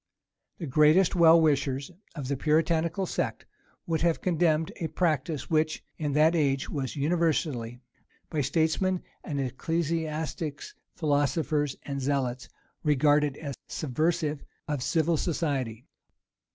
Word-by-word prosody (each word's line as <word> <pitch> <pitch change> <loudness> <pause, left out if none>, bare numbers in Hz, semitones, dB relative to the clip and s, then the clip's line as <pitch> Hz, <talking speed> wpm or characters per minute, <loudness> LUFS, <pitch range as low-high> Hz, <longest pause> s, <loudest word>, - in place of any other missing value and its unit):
The 170 - -5
greatest 155 +6 +4
well 170 -1 +7
wishers 140 -2 +1 0.2
of 145 -5 -5
the 140 - 0
Puritanical 165 +5 +1
sect - - -3 0.4
would 160 -2 -1
have 170 -1 +2
condemned 165 -3 +1
a 165 - -2
practice, 155 -3 -1
which 155 -1 0 0.2
in 150 -3 -1
that 155 +3 +4
age 140 -4 +1
was 135 -2 -3
universally, 145 -6 0 0.5
by 155 - -1
statesmen 160 +6 +1 0.2
and 145 -2 -3
ecclesiastics 155 +2 -2 0.2
philosophers 145 -1 0
and 140 -1 -4
zealots, 130 -3 -1 0.3
regarded 145 -1 +3
as 140 -3 -5
subversive 155 +1 -1 0.2
of 145 -3 -2
civil 165 +4 +1
society. 135 -9 -2
155 Hz, 115 wpm, -28 LUFS, 140-165 Hz, 0.5 s, well